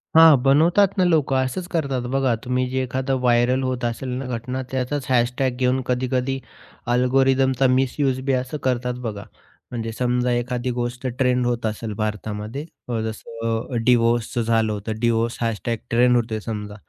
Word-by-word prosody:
हां. 160 -1 +9
बनवतात 165 +9 +5
ना 185 - +4
लोक. 155 -6 +2
असंच 130 +7 -1
करतात 140 -6 -1
बघा. 135 -2 +2
तुम्ही 125 0 0
जे 130 +1 -1
एखादं 130 +1 -1
व्हायरल 125 +1 +3
होत 130 -1 -2
असेल 120 +2 -3
ना 135 - -4
घटना 125 +3 -4
त्याचंच 130 +1 -2
हॅशटॅग 125 +1 +2
घेऊन 130 +1 +1
कधी-कधी 130 +1 -1 0.5
अल्गोरिदमचा 130 +1 +3
मिसयूज 130 +1 +1
बी 135 - +1
असं 130 +3 -2
करतात 125 -1 0
बघा. 105 -2 -4 0.5
म्हणजे 115 -2 -3
समजा 125 +1 0
एखादी 120 +1 -1
गोष्ट 120 +1 -3
ट्रेंड 125 -2 +2
होत 120 -1 -1
असेल 110 0 -3
भारतामध्ये, 110 +5 -4 0.2
अ, 115 -2 -1
जसं 115 +2 -4
डिवोर्सचं 120 -1 +2
झालं 115 -1 +1
होतं. 105 +1 -5
डिवोर्सचं 115 0 0
# 115 +1 -2
ट्रेंड 125 +1 +4
होतोय 115 -2 0
समजा. 105 -1 -6
125 Hz, 155 wpm, -22 LUFS, 115-130 Hz, 0.5 s, हां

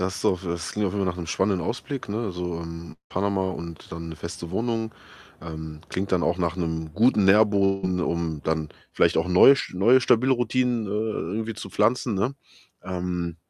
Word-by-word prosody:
das 95 +1 -2
auf 90 0 +2
es - - -4
das 85 -1 -3
klingt 105 -1 0
auf 90 - -2
jeden 100 -1 0
Fall - - +2
nach - - -12
’nem 85 -2 -5
spannenden 95 0 0
Ausblick, 130 +3 -4
ne, 105 +2 -2
also, 90 -3 -4
hm, 85 -1 -8
Panama 95 0 0
und 85 -3 -8
dann 85 0 -6
’ne 80 - -6
feste 85 +1 -7
Wohnung. 115 +1 -1 0.5
Ähm, 80 -2 -7
klingt 95 +1 -3
dann 90 -2 +3
auch 85 +2 +1
nach 85 -2 0
’nem 80 -3 -3
guten 110 0 +4
Nährboden, 95 -2 +3
um 85 -4 -2
dann 80 -1 -1 0.2
vielleicht - - +3
auch 80 - +2
’n 90 - -2
neusch 135 +8 +6
neue 115 +8 +5
stabile 125 +2 +4
Routinen, 125 -2 +1
äh - - -5
äh, - - -2 0.4
irgendwie 110 +1 -3
zu - - -7
pflanzen, 115 +1 +1
ne? 125 +8 -1 0.5
Ähm 90 -2 -3
95 Hz, 200 wpm, -25 LUFS, 85-105 Hz, 0.5 s, neusch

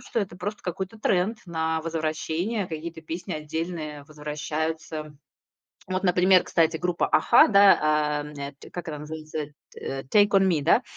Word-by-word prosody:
что 245 - -3
это 185 -3 -5
просто 205 +4 -5
какой-то 190 +4 -5
тренд 205 +2 +1
на 160 -1 -1
возвращение, 165 +5 -2
какие-то 160 0 -6
песни 170 +3 -6
отдельные 155 -1 -4
возвращаются. 155 +1 -4 0.7
Вот, 185 0 -1
например, 180 +1 +5
кстати, 165 -1 +2
группа 180 +1 0
"Аха", - - +6
да, 200 -1 +7 0.5
а, - - -9 0.5
как 175 -1 -6
она 150 -2 -5
называется, 155 0 -5 0.3
э, 135 0 -5
"Take 205 +10 +4
on 195 -1 +4
me", 165 -5 +2
да, 170 - +4
165 Hz, 140 wpm, -26 LUFS, 155-185 Hz, 0.7 s, да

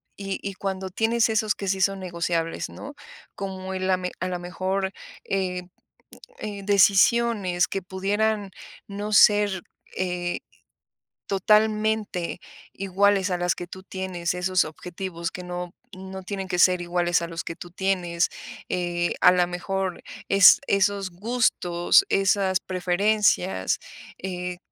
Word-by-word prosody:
y 195 -1 -4
y 200 - -4
cuando 190 0 -4
tienes 225 +4 +2
esos 215 -1 +1
que: 200 - -6
"Sí 190 0 0
son 195 +1 +2
negociables", 170 -2 -2
¿no? 285 +2 -9 0.4
Como 190 -1 -5
el 185 0 -2
la 185 -1 +2 0.2
a 185 - 0
la 180 -1 -3
mejor, 190 +2 -2 0.3
eh, 185 -2 -2 0.8
eh, 200 -2 -6
decisiones 200 -1 +4
que 195 - -3
pudieran 200 +3 -1 0.4
no 205 +1 -5
ser, 205 -3 +5 0.3
eh, 180 -1 -2 0.9
totalmente 210 -2 +1 0.3
iguales 195 0 +2
a 180 - +1
las 175 0 0
que 175 - -6
tú 185 +2 -10
tienes. 185 -3 -3
Esos 180 0 +1
objetivos, 170 +1 -6
que 180 - -7
no 180 0 -6 0.2
no 190 0 -8
tienen 195 0 -5
que 180 -1 -2
ser 180 0 +5
iguales, 175 0 +1
a 170 - -3
los 165 0 -5
que 165 - -6
tú 175 - -10
tienes. 180 -2 0 0.4
Eh, 175 -1 -1
a 180 - +8
la 180 -1 +2
mejor, 185 +1 -3 0.3
es 195 -1 +8
esos 195 -1 +1
gustos, 185 - +2
esas 195 -1 +2
preferencias, 185 - +1 0.4
eh, 180 -1 -5
190 Hz, 135 wpm, -25 LUFS, 180-200 Hz, 0.9 s, a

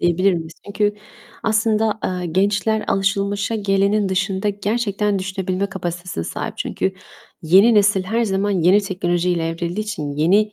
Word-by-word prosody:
diyebilir 185 +3 +3
miyiz? 160 -1 -5
Çünkü 205 0 0 0.5
aslında, 220 0 +1
eee, 180 -1 -2
gençler 205 +5 +1
alışılmışa 200 +2 0
gelenin 200 0 +1
dışında 190 +1 -1
gerçekten 205 0 -1
düşünebilme 190 0 -2
kapasitesine 175 - -5
sahip. - - -5
Çünkü 190 - -2 0.5
yeni 195 +8 +5
nesil 205 -2 +3
her 230 +5 0
zaman 200 0 0
yeni 185 +1 +4
teknolojiyle 175 -3 -1
evrildiği 170 +4 -3
için, 175 -10 -4
yeni 195 +9 +2
195 Hz, 130 wpm, -20 LUFS, 180-210 Hz, 0.5 s, yeni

